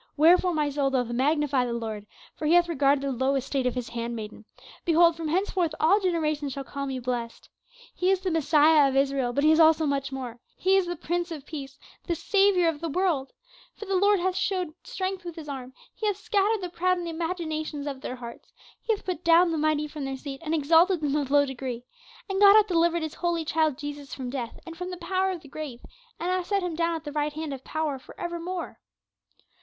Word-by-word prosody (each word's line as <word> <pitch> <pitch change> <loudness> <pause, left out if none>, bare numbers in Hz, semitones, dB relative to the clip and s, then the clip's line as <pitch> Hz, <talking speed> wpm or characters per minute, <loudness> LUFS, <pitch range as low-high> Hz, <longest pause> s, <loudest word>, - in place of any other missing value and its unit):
"Wherefore 350 +3 +5
my 300 -2 0
soul 280 -1 +1
doth 250 -3 0
magnify 280 +1 +1
the 240 -1 -2
Lord, 220 -3 -5 0.3
for 305 - -3
he 330 - +5
hath 350 0 +5
regarded 280 -3 +2
the 275 - -1
low 260 +2 +1
estate 270 0 -1
of 250 - -1
his 250 -2 -4
hand 235 0 -4
maiden; 215 -1 -8 0.4
behold 335 0 +4
from 325 -1 -4
henceforth 350 -1 0
all 370 +7 +4
generations 310 -7 -1
shall 275 - -5
call 280 +1 -5
me 265 -1 -3
blessed. 245 -2 -4 0.5
He 365 - 0
is 385 -1 +3
the 375 -1 -2
Messiah 305 -2 +5
of 265 - -3
Israel, 270 -2 +1
but 280 +4 0
he 310 - +6
is 315 - +4
also 320 0 +5
much 275 -1 -1
more, 250 -3 -6 0.2
he 380 +1 +3
is 385 -2 +2
the 350 - -3
Prince 345 +2 -2
of 305 -4 -7
Peace, 275 -4 -8 0.3
the 340 - 0
Saviour 390 -1 +3
of 315 -3 -1
the 335 - -2
world. 315 -5 0 0.4
For 425 - -8
the 390 - -2
Lord 405 +1 +4
hath 365 +1 0
shewed 370 -3 -1
strength 380 -6 -4
with 345 -2 -7
his 320 -3 -9
arm, 260 -3 -6 0.2
he 435 - -3
hath 410 -2 0
scattered 415 0 +1
the 360 - -3
proud 365 +1 +1
in 350 - -4
the 340 - -4
imaginations 320 -3 -3
of 275 -2 -5
their 255 - -5
hearts. 235 -2 -10 0.3
He 450 - +1
hath - - -15
put 360 -2 -3
down 335 +1 +5
the 325 - -1
mighty 305 0 +1
from 295 -2 -6
their 270 0 -4
seat, 270 +1 -7
and 320 0 -1
exalted 325 +4 +4
them 290 -1 0
of 285 -3 -1
low 285 0 +5
degree. 255 -3 -5 0.4
And 390 -1 -2
God 405 0 +9
hath 430 -1 +7
delivered 340 -3 +2
his 315 - -4
holy 340 -2 -1
child 315 -3 +1
Jesus 290 -1 -7
from 255 -2 -5
death 245 -4 -5
and 330 - -8
from 360 +1 -5
the 360 - -6
power 380 +1 0
of 365 -3 -4
the 290 - -14
grave, 280 -4 -7 0.4
and 350 +2 -1
hath 365 -1 -1
set 400 -2 0
him 355 -2 -2
down 335 +1 0
at 320 - -6
the 295 - -6
right 295 0 -1
hand 310 -1 -4
of 265 -1 -8
power 310 -3 -2
for - - -15
ever 345 0 -4
more." 360 +1 -5
315 Hz, 235 wpm, -26 LUFS, 275-350 Hz, 0.5 s, God